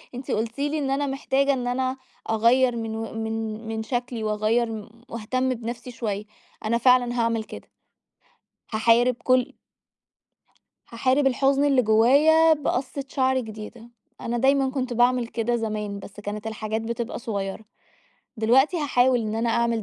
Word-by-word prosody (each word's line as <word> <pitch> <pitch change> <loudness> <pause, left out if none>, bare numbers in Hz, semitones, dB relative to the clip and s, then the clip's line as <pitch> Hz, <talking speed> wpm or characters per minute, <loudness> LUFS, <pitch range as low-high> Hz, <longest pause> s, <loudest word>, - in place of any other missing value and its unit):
أنتِ 255 +1 -6
قُلتِ 225 +4 -2
لي 290 +2 0
إن 275 -2 -1
أنا 285 +1 0
محتاجة 275 0 +1
إن 250 -2 -3
أنا 260 +1 -1 0.3
أغيّر 235 +3 +3
من 225 -1 -4
و 225 0 -5
مِن 225 0 -4
مِن 220 0 -3
شكلي، 240 0 -3
وأغير 215 +2 +1
م 220 0 -7 0.2
وأهتم 255 +3 -2
بنفسي 240 +1 -6
شوية. 210 -4 -4 0.4
أنا 230 +2 +2
فعلًا 245 0 +3
هاعمل 230 -1 0
كده. - - -11 1.0
هاحارب 230 +3 +3
كُل 255 -1 +2 1.3
هاحارب 260 +4 +1
الحزن 270 +2 +2
اللي 275 -3 +4
جُوّايا 285 +9 +5
بقصة 275 -2 -3
شعر 260 -1 +1
جديدة. 220 0 -9 0.3
أنا 240 +1 -2
دايمًا 270 +1 +3
كنت 260 -2 -2
باعمل 245 0 +2
كده 240 0 -1
زمان، 210 -3 -3
بس 200 +1 -11
كانت 210 +1 -5
الحاجات 220 0 -3
بتبقى 235 +1 -4
صغيرة. 200 -2 -4 0.7
دلوقتي 260 +9 +3
هاحاول 260 -5 +2
إن 215 -1 -3
أنا 230 +1 0
أعمل 235 -1 +1
235 Hz, 145 wpm, -24 LUFS, 220-260 Hz, 1.3 s, جُوّايا